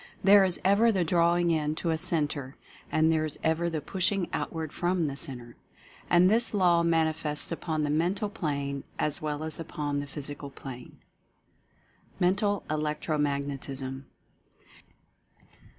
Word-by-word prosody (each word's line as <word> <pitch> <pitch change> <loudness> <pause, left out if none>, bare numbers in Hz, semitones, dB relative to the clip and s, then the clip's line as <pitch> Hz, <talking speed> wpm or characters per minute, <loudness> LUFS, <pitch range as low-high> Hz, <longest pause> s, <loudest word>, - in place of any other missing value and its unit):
There 200 0 +7
is 185 -2 +1
ever 210 +4 +5
the 190 -4 +1
drawing 170 +1 +2
in 155 -1 0
to 165 +1 -1
a 160 - 0
centre 150 -5 0 0.2
— - - -23
and 160 +1 +3
there 155 -1 +1
is 155 -2 -4
ever 165 +1 +1
the 160 -2 -3
pushing 185 +3 0
outward 160 -3 -3
from 175 -1 0
the 140 -2 -3
centre. 120 -4 -2 0.5
And 175 +1 +6
this 225 +2 +3
Law 175 -3 +4
manifests 160 -2 +1
upon 160 -2 -2
the 145 - 0
Mental 180 +7 0
Plane 140 -9 -3
as 150 -1 -1
well 150 0 -3
as 160 +1 -4
upon 145 -3 -3
the 145 - -5
Physical 145 0 -6
Plane. 130 -2 -10 1.2
MENTAL 200 +3 +1
ELECTRO 150 0 -1
MAGNETISM. 140 -2 -3
160 Hz, 145 wpm, -28 LUFS, 145-175 Hz, 1.2 s, There